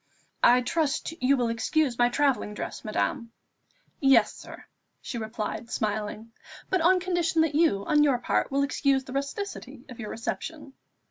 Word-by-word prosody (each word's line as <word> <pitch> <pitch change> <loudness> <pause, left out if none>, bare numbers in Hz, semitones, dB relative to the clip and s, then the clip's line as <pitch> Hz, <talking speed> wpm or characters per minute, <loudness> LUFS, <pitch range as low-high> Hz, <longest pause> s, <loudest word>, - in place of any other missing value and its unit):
"I 245 +1 +6
trust 310 +4 -1
you 270 +2 +3
will 240 -2 0
excuse 245 +3 0
my 240 0 +5
travelling 265 -5 0
dress, - - -6
madame." 230 +2 -2 0.7
"Yes, 270 -6 +4
sir," - - -12 0.3
she 235 - -6
replied 220 +1 -5
smiling; 215 +1 -3 0.4
"but 375 -2 +2
on 365 +3 +4
condition 345 -3 +1
that 315 -2 -1
you, 290 -11 +2
on 295 -1 +4
your 275 -4 +3
part, 240 - 0
will 280 0 +1
excuse 275 -1 +1
the 255 - -9
rusticity 280 - -5
of 245 - -11
your 215 -3 -5
reception." 290 +5 -5
270 Hz, 155 wpm, -27 LUFS, 230-305 Hz, 0.7 s, I